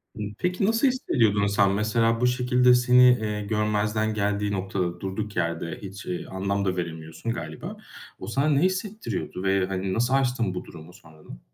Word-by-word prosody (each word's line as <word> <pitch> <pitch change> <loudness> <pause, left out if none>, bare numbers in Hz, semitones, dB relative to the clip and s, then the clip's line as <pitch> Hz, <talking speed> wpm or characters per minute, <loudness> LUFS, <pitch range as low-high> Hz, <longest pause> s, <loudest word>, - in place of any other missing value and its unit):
Hımm, 105 -1 -5
peki, 180 +2 0
nasıl 225 +5 +3
hissediyordun 115 - +2
sen? 100 -1 +3
Mesela, 115 +3 +1
bu 125 - +4
şekilde 125 0 +3
seni, 125 0 +5 0.2
eee, 105 -1 -2
görmezden 105 +1 0
geldiği 105 -1 -1
noktada 95 -3 -2
durduk 100 +3 -4
yerde 85 -1 -2
hiç, 100 +1 -9
eee, 90 - -4
anlam 100 +1 -2
da 95 -1 -1
veremiyorsun 80 +5 -4
galiba. 80 -4 -7 0.4
O - - -7
sana 140 +3 +1
ne 140 -2 +3
hissettiriyordu 185 - -2
ve, 95 -1 +2
hani, 95 0 -2
nasıl 120 +5 +1
aştın 125 -7 +1
bu 90 - -5
durumu 85 +1 -12
sonradan? 80 -8 -14
105 Hz, 165 wpm, -25 LUFS, 95-125 Hz, 0.4 s, seni